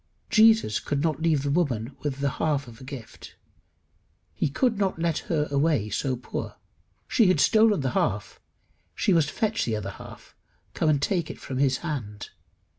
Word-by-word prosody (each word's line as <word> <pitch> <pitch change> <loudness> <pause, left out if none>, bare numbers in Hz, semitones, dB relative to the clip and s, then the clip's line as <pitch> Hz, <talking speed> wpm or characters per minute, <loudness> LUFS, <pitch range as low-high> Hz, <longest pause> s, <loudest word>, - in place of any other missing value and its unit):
Jesus 220 - +5
could 145 0 -2
not 160 -2 0
leave 160 -4 +2
the 140 - -1
woman 140 -7 -1
with 140 -2 -4
the 140 - +2
half 145 -4 0
of 120 +2 -13
a - - -10
gift. 130 -4 -10 1.0
He - - -1
could 225 - 0
not 195 -4 0
let 165 -1 0
her 150 -3 +1
away 140 -7 +1
so 130 +5 -1
poor. 125 - -6 0.5
She 230 -7 +3
had 185 -5 +3
stolen 215 -1 +4
the 130 -2 -1
half: 105 -3 -1 0.6
she 195 - +2
must 160 -4 +3
fetch 215 +6 -1
the 115 - -1
other 100 -2 -4
half - - -13 0.4
come 155 - +1
and 145 -2 +3
take 170 +2 -1
it - - -8
from 130 -1 -5
his 135 -2 +2
hand. 110 -10 -5
145 Hz, 180 wpm, -26 LUFS, 130-170 Hz, 1.0 s, Jesus